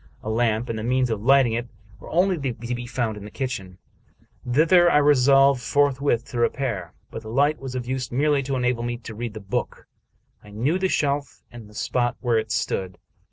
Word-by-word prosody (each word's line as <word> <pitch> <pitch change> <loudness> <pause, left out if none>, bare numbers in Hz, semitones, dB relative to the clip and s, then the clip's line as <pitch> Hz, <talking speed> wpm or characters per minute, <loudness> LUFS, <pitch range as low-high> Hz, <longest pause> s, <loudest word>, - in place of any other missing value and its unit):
A 110 - -3
lamp, 115 0 +1
and 115 -2 -3
the - - -5
means 125 +1 +1
of 110 -2 -2
lighting 130 -1 +4
it, 120 +1 -2 0.3
were - - -11
only 185 +3 +2
to 125 -5 -4
be 120 0 -6
found 120 -4 -2
in 105 - -9
the 105 - -8
kitchen. 105 -8 -5 0.7
Thither 175 +6 +5
I 150 - +4
resolved 140 -2 +5
forthwith 140 -3 +1
to 120 - -3
repair; 115 -8 -1 0.2
but 110 - -6
the 110 - -10
light 145 +6 +2
was 130 -1 -7
of 125 -1 -3
use 130 -2 -3
merely 145 +2 +2
to 135 0 -3
enable 125 -1 0
me 120 0 -3
to 115 -1 -9
read 115 0 -5
the - - -5
book. 100 -1 -4 0.6
I 105 - -14
knew 130 - 0
the 190 0 +1
shelf 145 -2 -1
and 115 -3 -11
the 105 - -17
spot 120 +2 -1
where 120 -3 +1
it 110 0 -5
stood. 95 -5 -2
125 Hz, 205 wpm, -24 LUFS, 110-140 Hz, 0.7 s, Thither